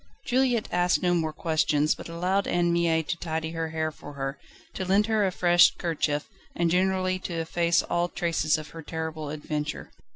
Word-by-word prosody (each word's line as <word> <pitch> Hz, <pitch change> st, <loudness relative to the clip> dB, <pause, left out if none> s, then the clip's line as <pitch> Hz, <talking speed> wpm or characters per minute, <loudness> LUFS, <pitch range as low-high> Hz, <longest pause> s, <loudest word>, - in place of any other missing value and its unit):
Juliette 250 Hz, -3 st, +2 dB
asked 175 Hz, +1 st, +2 dB
no 175 Hz, -1 st, +3 dB
more 160 Hz, -2 st, 0 dB
questions, 155 Hz, -1 st, +1 dB
but -, -, -10 dB
allowed 180 Hz, +4 st, 0 dB
Anne 175 Hz, -1 st, +2 dB
Mie 165 Hz, -1 st, +2 dB
to 165 Hz, +2 st, -3 dB
tidy 160 Hz, -1 st, -3 dB
her 165 Hz, -1 st, -3 dB
hair 160 Hz, 0 st, -2 dB
for 145 Hz, -1 st, -11 dB
her, 135 Hz, 0 st, -4 dB, 0.3 s
to -, -, -3 dB
lend 195 Hz, +3 st, +3 dB
her 215 Hz, -2 st, +2 dB
a -, -, -1 dB
fresh 175 Hz, -1 st, +5 dB
kerchief 150 Hz, -3 st, -1 dB, 0.3 s
and 170 Hz, -1 st, +1 dB
generally 185 Hz, 0 st, +1 dB
to 180 Hz, -, -5 dB
efface 170 Hz, +1 st, +1 dB
all 175 Hz, 0 st, 0 dB
traces 165 Hz, -3 st, 0 dB
of 155 Hz, -1 st, -8 dB
her 165 Hz, -, -9 dB
terrible 160 Hz, -1 st, -5 dB
adventure. 150 Hz, 0 st, -4 dB
170 Hz, 185 wpm, -27 LUFS, 155-180 Hz, 0.3 s, fresh